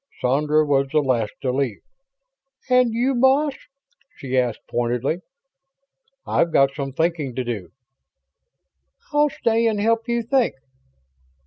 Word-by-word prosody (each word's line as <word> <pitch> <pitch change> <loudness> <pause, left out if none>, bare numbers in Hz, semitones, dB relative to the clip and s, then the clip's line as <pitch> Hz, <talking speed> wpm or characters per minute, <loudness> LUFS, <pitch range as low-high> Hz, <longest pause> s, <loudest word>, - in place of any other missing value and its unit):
Sandra 150 +4 +2
was 140 -1 +2
the 155 - +1
last 125 -7 0
to 130 - +1
leave. 130 -4 -2 0.9
"And 250 -2 +4
you, 245 +4 +1
boss?" 265 +4 +3 0.6
she 130 -1 -5
asked 125 -3 0
pointedly. 120 +7 -1 1.1
"I've 170 - +1
got 135 -2 +3
some 135 -1 -4
thinking 155 -3 -1
to 130 - -1
do." 115 -7 -5 1.4
"I'll 295 0 +4
stay 230 -3 +1
and 215 -2 0
help 225 +2 +1
you 235 0 0
think?" 245 +1 +1
150 Hz, 125 wpm, -22 LUFS, -, 1.4 s, And